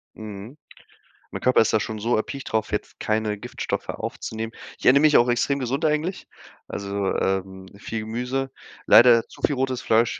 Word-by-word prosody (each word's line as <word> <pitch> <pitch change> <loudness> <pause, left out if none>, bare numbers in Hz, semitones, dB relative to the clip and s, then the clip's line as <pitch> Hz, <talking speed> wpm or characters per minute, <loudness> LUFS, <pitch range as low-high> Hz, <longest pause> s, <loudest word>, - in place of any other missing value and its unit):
Mhm. 110 +4 -9 0.7
Mein - - -6
Körper 125 - +4
ist 110 - 0
da 110 - +3
schon 110 -1 -4
so 115 +3 +1
erpicht 135 +5 -4
drauf, 110 -1 0
jetzt 105 - -4
keine 110 -1 0
Giftstoffe - - -5
aufzunehmen. 110 0 -5 0.3
Ich - - -7
ernähre 135 +2 +7
mich 150 0 +5
auch 120 - +5
extrem 125 +3 +1
gesund 135 +4 -2
eigentlich, 155 +4 -1 0.4
also, 100 0 -3
ähm, 95 0 -2
viel 110 +2 -5
Gemüse, 125 +5 -3 0.4
leider 115 -1 +7
zu - - -16
viel 145 - +2
rotes 130 -1 -1
Fleisch. 115 +1 +2
115 Hz, 170 wpm, -24 LUFS, 110-130 Hz, 0.7 s, ernähre